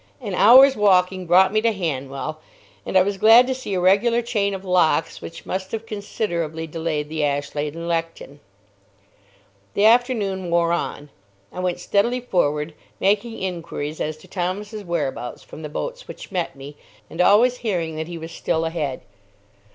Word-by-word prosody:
An 210 -7 -5
hour's 260 +8 +7
walking 185 -3 +2
brought 185 +3 +5
me 215 - +2
to 230 0 +2
Hanwell, 155 -5 -4 0.5
and - - +2
I 185 - +6
was 200 0 -3
glad 225 +4 +7
to 260 - -1
see 255 -6 -5
a - - 0
regular 215 +6 +3
chain 200 -4 -1
of 190 0 -9
locks 180 -3 +1
which 165 - -9
must 190 0 -4
have 225 0 -4
considerably 170 -7 -3
delayed 160 -2 -3
the 155 0 -4
Ashlade 145 +1 -2
and 170 0 -6
Lechton. 165 -4 -4 1.4
The 205 - +3
afternoon 220 -6 +2
wore 170 0 +2
on. 150 -4 -3 0.4
I - - -7
went 180 -1 -1
steadily 220 +7 +1
forward, 150 -9 -1 0.3
making 210 +4 +1
inquiries 165 -4 -5
as 155 0 -3
to 155 - -17
Thomas's 205 +3 -4
whereabouts 150 -8 -4
from - - -11
the 150 - -6
boats - - -5
which - - -10
met 175 -6 -2
me, 140 +2 -11 0.3
and 165 - -3
always 235 +7 +5
hearing 175 -9 -2
that 160 0 -4
he 170 -1 -6
was 165 +1 -8
still 165 0 -1
ahead. 155 -5 -3
180 Hz, 165 wpm, -22 LUFS, 160-210 Hz, 1.4 s, hour's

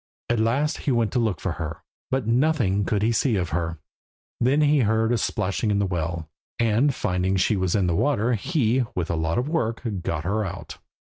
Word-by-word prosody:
At 120 -2 +1
last 135 +8 +1
he 140 - -1
went 115 -3 +1
to 125 - +1
look 110 -9 0
for - - -2
her, - - -5 0.3
but 130 -2 0
nothing 115 -5 +2
could 105 -2 0
he 115 - +3
see 115 +1 +1
of 90 -3 -1
her. 80 +1 -2 0.6
Then 130 +5 +3
he 150 0 +4
heard 110 -1 +2
a 120 - +2
splashing 105 +2 -1
in 105 - +2
the 100 - +1
well, 85 -2 -3 0.3
and 115 +5 +3
finding 90 -5 -1
she 95 +3 +2
was 95 -1 0
in 100 -3 +2
the 85 -2 +1
water, 125 - +1
he, 125 - +1
with 90 -2 -1
a - - 0
lot 80 +1 -1
of 125 - 0
work, 120 -8 -1 0.2
got 80 -3 -2
her 105 +5 0
out. 95 - -7
110 Hz, 210 wpm, -24 LUFS, 90-125 Hz, 0.6 s, he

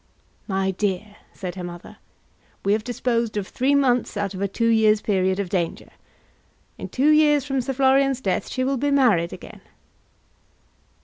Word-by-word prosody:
"My 190 -2 0
dear," 205 +1 -3
said 180 -2 -6
her 185 - -7
mother, 175 0 -9 0.7
"we 200 - +3
have 215 0 -1
disposed 235 -2 -1
of 200 -2 -3
three 270 +3 +1
months 250 -5 +1
out 200 -1 -2
of 190 - -6
a 200 - +1
two 230 +4 -1
years' 215 -1 +4
period 190 -2 0
of 200 - -2
danger. 175 -3 -3 0.9
In - - -6
two 280 +4 +2
years 295 -2 +4
from 270 -2 -1
Sir 270 +2 -3
Florian's 270 0 +3
death 195 -7 -2
she 255 - -2
will 270 +1 0
be 285 +3 0
married 230 -12 +3
again." - - -11
220 Hz, 170 wpm, -23 LUFS, 195-265 Hz, 0.9 s, years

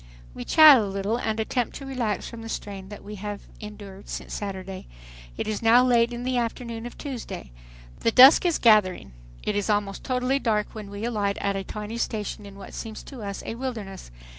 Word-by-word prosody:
We 125 - -7
chat 310 -4 +9
a - - +1
little 200 +3 -1
and 220 -2 -2
attempt 235 +1 -1
to 275 - -7
relax 240 -7 -2
from 230 -1 -9
the 225 - -8
strain 195 -3 -6
that 205 - -10
we 210 +1 -8
have 205 +1 -5 0.2
endured 205 -2 -10
since - - -6
Saturday. 190 -2 -6 0.5
It - - -3
is 215 -1 -2
now 235 +2 +6
late 240 -1 +3
in 240 0 -5
the 255 0 0
afternoon 235 0 -4
of 240 - -12
Tuesday. 260 - -7 0.5
The 230 - +2
dusk 260 +5 +9
is 345 -3 +2
gathering. 210 - +4 0.3
It 210 - -1
is 205 +1 -1
almost 205 -2 0
totally 255 +1 0
dark 215 -5 0
when 215 -2 -8
we 200 +2 -5
alight 205 -4 -1
at 200 0 -1
a 195 - -2
tiny 210 +4 -6
station 210 -2 -3
in 200 - -12
what 200 - -11
seems 220 -2 -7
to 265 -4 -10
us 200 -1 -5
a - - -4
wilderness. 225 - -6
215 Hz, 205 wpm, -25 LUFS, 200-240 Hz, 0.5 s, chat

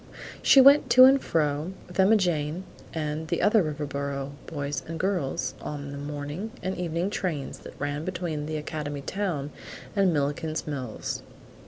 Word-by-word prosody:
She 275 - +7
went 275 +2 +7
to 255 - +12
and 270 +1 +7
fro, 150 +2 0
with 180 - -9
Emma 195 +4 +6
Jane 170 -2 0 0.3
and 155 0 -3
the - - 0
other 210 +1 +5
Riverboro 140 -3 -3 0.2
boys 145 -3 -3
and 165 0 -5
girls, 155 -9 -1
on 145 -1 -5
the 140 - -6
morning 145 +7 -5
and 185 +1 -1
evening 175 +2 -1
trains 160 -9 -3
that - - -12
ran 145 +1 -2
between 170 -4 -3
the 155 0 -2
academy 150 -1 -4
town 155 -4 -2 0.4
and 195 -3 +4
Milliken's 155 +1 -1
Mills. 130 -7 -4
155 Hz, 155 wpm, -27 LUFS, 145-185 Hz, 0.4 s, to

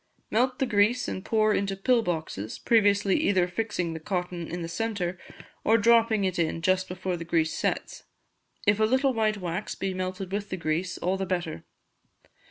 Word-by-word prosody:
Melt 250 +3 +2
the 265 - +1
grease 235 +1 +2
and 185 - -4
pour 215 -1 +2
into 195 -1 0
pill 240 +4 +3
boxes, 160 - -4
previously 205 -3 +3
either 185 -3 +2
fixing 180 -3 -2
the 160 - -5
cotton 175 0 -3
in 175 0 -5
the - - -3
centre, 180 -1 -2 0.4
or 225 - +4
dropping 230 -1 +4
it 185 -2 -1
in 165 0 -1
just 185 +1 +2
before 180 0 -3
the 170 - -5
grease 165 -1 +1
sets. - - -3 0.6
If 205 +1 +3
a 215 - +4
little 260 +4 +2
white 215 -2 +1
wax 180 +2 -4
be 195 -1 -2
melted 185 +1 -4
with 205 0 -3
the 185 - -3
grease, 165 +2 -2
all 185 +2 0
the 190 0 -3
better. 175 - -3
190 Hz, 180 wpm, -27 LUFS, 175-215 Hz, 0.6 s, or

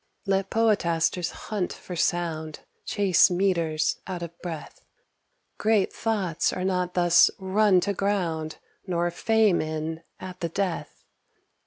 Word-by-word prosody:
Let 195 -1 0
poetasters 180 -6 +1
hunt 205 -4 -4
for 180 - -8
sound, 160 -3 -1 0.3
Chase 195 -4 +4
metres, 170 -4 +1
out 180 -2 -4
of 170 0 -8
breath; 165 -4 -7 0.8
Great 215 -2 +2
thoughts 190 -7 0
are 185 - -4
not 180 -1 -1
thus 175 -1 +6
run 190 0 +3
to 200 - -1
ground, 175 -6 -1 0.3
Nor 175 -1 0
fame 220 0 +2
in 155 +1 -4 0.2
at 185 -1 -8
the 170 - -2
death. 185 0 -3
180 Hz, 125 wpm, -26 LUFS, 165-195 Hz, 0.8 s, thus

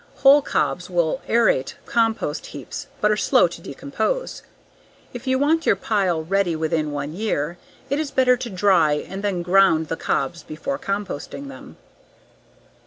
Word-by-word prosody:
Whole 280 +2 +8
cobs 180 -9 -1
will 175 +7 0
aerate 225 - +2
compost 225 - 0
heaps - - -8
but 210 - +3
are - - +3
slow 250 -1 +4
to 170 0 -10
decompose. 215 - -3 0.7
If 245 +2 -8
you 260 0 +2
want 315 +4 +1
your - - +5
pile 185 -7 0
ready 190 -1 +1
within 155 -1 -1
one 145 +1 -4
year, 175 -4 -2 0.3
it 280 +2 -1
is 310 -2 -2
better 255 -2 +4
to 245 -1 -6
dry 185 -6 +3
and 190 +6 -5
then 190 -4 -1
grind 175 -3 +4
the 165 - -1
cobs 140 +5 -1
before 275 - -5
composting 205 - -4
them. - - -12
195 Hz, 155 wpm, -22 LUFS, 165-250 Hz, 0.7 s, Whole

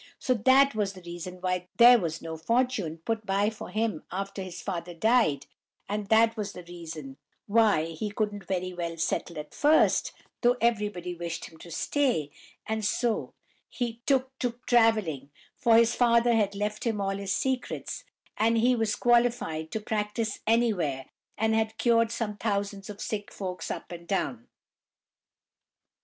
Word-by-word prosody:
So 255 - +1
that 260 +4 +5
was 205 -2 -1
the 185 -2 -13
reason 175 +1 -7
why 180 -1 -1
these 240 0 +9
was 165 -3 -4
no 165 -1 -5
fortune 225 -2 0
put 225 -1 -1
by 200 +1 +1
for 220 - -9
him 215 -6 -1
after 195 +2 -4
his 185 -2 -7
father 175 -3 -5
died, 220 - +2 0.4
and 205 0 -3
that 225 +1 +4
was 210 -2 -4
the 180 - -9
reason 160 -5 -8 0.3
why 210 -7 +3
he 185 +7 -4
couldn't 205 -2 -3
very 185 -1 -2
well 170 -1 -4
settle 170 0 -2
at 150 - -7
first, 300 +2 +3 0.3
though 245 0 +4
everybody 210 -6 0
wished 170 -1 -5
him 160 - -14
to 170 - -11
stay, 170 - 0 0.3
and 220 0 -2
so 230 +2 0 0.3
he 235 -2 -4
took 265 -1 +1
to 245 -2 -1
travelling; 215 - +2 0.3
for 230 -1 +4
his 230 +1 +5
father 235 0 +4
had 205 -3 +1
left 210 +1 -2
him 225 -3 -1
all 195 0 0
his 200 -1 -4
secrets, 260 +4 -2 0.3
and 230 +1 +3
he 245 +3 +4
was 225 -2 0
qualified 235 -10 +2
to 220 - -3
practise 215 +1 -2
anywhere, 200 - +1 0.3
and 220 0 +1
had 220 0 0
cured 230 -1 +3
some 210 -3 -3
thousands 200 -2 -2
of 205 -1 -8
sick 205 -2 -4
folks 185 -2 -5
up - - -6
and 170 0 -9
down! 135 - -2
210 Hz, 160 wpm, -28 LUFS, 175-230 Hz, 0.4 s, these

